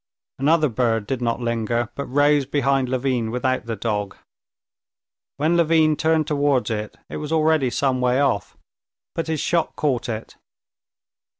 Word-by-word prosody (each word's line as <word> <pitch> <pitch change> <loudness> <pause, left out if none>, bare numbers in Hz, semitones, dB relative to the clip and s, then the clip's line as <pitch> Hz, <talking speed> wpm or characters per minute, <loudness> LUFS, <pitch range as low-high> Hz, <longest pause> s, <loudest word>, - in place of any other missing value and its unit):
Another 155 +3 +3
bird 115 -3 0
did 130 +2 -3
not 120 0 -1
linger, 115 0 -1
but 140 +2 -5
rose 145 0 +3
behind 135 -2 +1
Levin 125 -3 0
without 125 0 -1
the 115 - -2
dog. 105 -2 -3 1.2
When 155 +4 +2
Levin 160 -2 +3
turned 160 0 +1
towards 145 -5 +1
it, 105 -1 -4
it - - -6
was 150 0 -5
already 155 -4 +3
some 130 +1 0
way 125 +1 +2
off. 120 -9 0 0.6
But 165 -1 -3
his 160 -1 -1
shot 170 +1 0
caught 130 -6 -1
it. 110 -1 -6
135 Hz, 145 wpm, -22 LUFS, 120-150 Hz, 1.2 s, Another